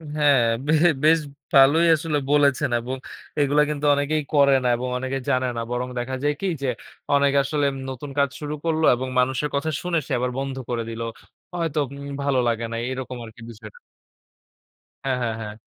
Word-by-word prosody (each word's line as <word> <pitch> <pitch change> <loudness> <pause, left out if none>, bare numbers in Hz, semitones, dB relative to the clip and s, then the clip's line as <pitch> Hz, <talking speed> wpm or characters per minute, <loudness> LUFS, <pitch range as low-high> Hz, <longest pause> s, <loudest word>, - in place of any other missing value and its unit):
হ্যাঁ, 145 -4 +4 0.2
বে - - +2 0.3
বেশ 160 +1 +6 0.3
ভালোই 145 +5 +6
আসলে 155 -1 -1
বলেছেন 145 -3 +3
এবং 125 +3 -4 0.4
এইগুলা 145 +1 +3
কিন্তু 150 0 -3
অনেকেই 150 +2 0
করে 140 -1 +5
না - - +1
এবং 125 +1 -3
অনেকেই 130 +1 -3
জানে 130 0 +2
না। - - -1
বরং 125 +1 -2
দেখা 130 +2 -3
যায় 145 0 +2
কী, 195 - 0
যে 135 - -1 0.5
অনেকে 140 0 +3
আসলে 145 +1 0
উম - - -7
নতুন 130 +2 -7
কাজ 140 - +3
শুরু 150 0 -4
করল 160 -1 +1
এবং 130 +2 -4
মানুষের 130 +3 +1
কথা 155 +3 0
শুনে 175 -1 -1
সে - - -9
আবার 125 0 -1
বন্ধ 135 -1 -3
করে 115 -1 -1
দিল। 115 0 -6 0.5
হয়তো 165 -4 -1
উম 140 0 -8
ভালো 140 -2 +2
লাগে 115 0 0
না - - -3
এরকম 130 -1 -5
আরকি 110 0 -14
বিষয়টা। 115 - -12 1.3
হ্যাঁ, 130 -2 0
হ্যাঁ, 115 -2 -1
হ্যাঁ। 105 -1 -6
140 Hz, 185 wpm, -23 LUFS, 125-150 Hz, 1.3 s, বেশ